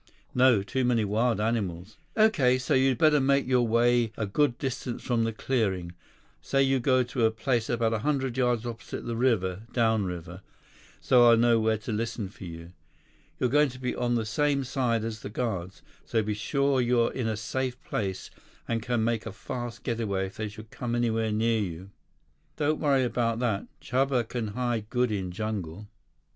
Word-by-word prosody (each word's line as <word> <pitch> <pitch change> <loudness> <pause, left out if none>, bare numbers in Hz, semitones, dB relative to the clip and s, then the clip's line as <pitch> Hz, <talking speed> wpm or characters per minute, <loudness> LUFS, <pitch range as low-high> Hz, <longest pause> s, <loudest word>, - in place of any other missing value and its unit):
"No, 125 -5 +4
too 130 +6 -1
many 120 -3 +2
wild 110 +3 +1
animals." 105 -3 -2 0.2
"Okay. 165 - +4
So, 130 - -1
you'd 130 -1 +3
better 150 +1 +5
make 140 0 +2
your 125 -2 +2
way 120 0 +3
a 110 - -1
good 120 +5 +1
distance 130 -3 -4
from 115 -2 +1
the 115 - 0
clearing. 100 -7 -1 0.5
Say 135 0 +2
you 135 0 +2
go 130 0 +3
to 125 0 -2
a 110 - +5
place 115 +1 -1
about 115 -2 +1
a 110 - 0
hundred 135 -1 -1
yards 125 -3 +1
opposite 115 -1 -6
the 115 - -3
river—downriver—so 110 0 0
I'll 115 - +6
know 115 0 +4
where 110 0 +2
to 110 +2 -6
listen 110 -2 -3
for 100 - -11
you. 85 0 -9 0.7
You're 125 - +1
going 150 +1 +4
to 130 - -10
be 125 -1 -2
on 120 -1 0
the 115 -2 0
same 140 +4 +1
side 125 -4 0
as 110 -1 -4
the - - -7
guards, 100 -5 -4 0.2
so 115 -2 0
be 105 0 -1
sure 140 +5 +1
you're 120 -1 +2
in 125 -4 -2
a 110 -1 -1
safe 125 +3 -3
place 95 -3 -3 0.4
and 115 -1 -1
can 120 -1 0
make 115 -1 -1
a - - -4
fast 120 +2 -6
getaway 110 -6 -1
if 95 - -10
they 110 - -2
should 110 +1 -11
come 120 -1 -3
anywhere 115 -2 0
near 110 +1 +1
you." 95 0 -6 0.6
"Don't 155 0 0
worry 140 -3 +3
about 115 -1 0
that. 115 -5 -1
Chuba 130 -2 0
can 120 -2 -3
hide 115 -1 -2
good 125 -1 +1
in 95 -3 -2
jungle." 100 -2 -4
115 Hz, 180 wpm, -27 LUFS, 110-125 Hz, 0.7 s, I'll